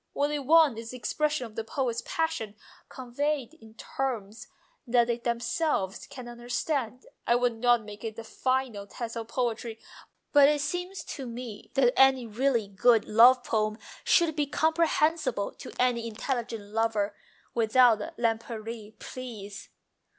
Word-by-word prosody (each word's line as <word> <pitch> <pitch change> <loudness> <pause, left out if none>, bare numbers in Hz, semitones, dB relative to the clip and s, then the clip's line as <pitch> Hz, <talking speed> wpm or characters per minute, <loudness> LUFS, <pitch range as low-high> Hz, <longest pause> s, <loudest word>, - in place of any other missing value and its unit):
What 285 +1 +1
they 295 0 -1
want 290 -3 +4
is 225 0 -8
the 255 - -7
expression 300 +1 -1
of 225 - -11
the 225 - -3
poet's 240 -1 -2
passion 320 -11 -2 0.3
conveyed 270 +2 -2
in 225 -8 -17
terms 225 -4 -4 0.4
that 240 0 +4
they 235 0 -1
themselves 235 - -1
can 255 -2 -9
understand. 245 +1 -3 0.2
I 235 - +4
would 245 0 +2
not 240 0 +3
make 210 +1 -10
it 220 -2 -4
the 230 - -7
final 255 -3 -2
test 230 +2 -6
of 225 -1 -5
poetry, 235 -2 -2 0.6
but 285 -1 +8
it 295 -1 +1
seems 355 +4 -3
to 270 -3 -6
me 235 -3 -8
that 250 -2 +4
any 265 -2 +5
really 230 0 0
good 215 +3 +3
love 245 +4 +6
poem 215 -2 0 0.3
should 335 -3 +3
be 295 -2 0
comprehensible 315 -6 +1
to - - -10
any 240 -2 +1
intelligent 225 -2 -4
lover... 215 -2 0 0.4
without 230 0 +4 0.2
Lempriere, 225 -1 -3
please 215 -7 -8
240 Hz, 145 wpm, -28 LUFS, 225-270 Hz, 0.6 s, but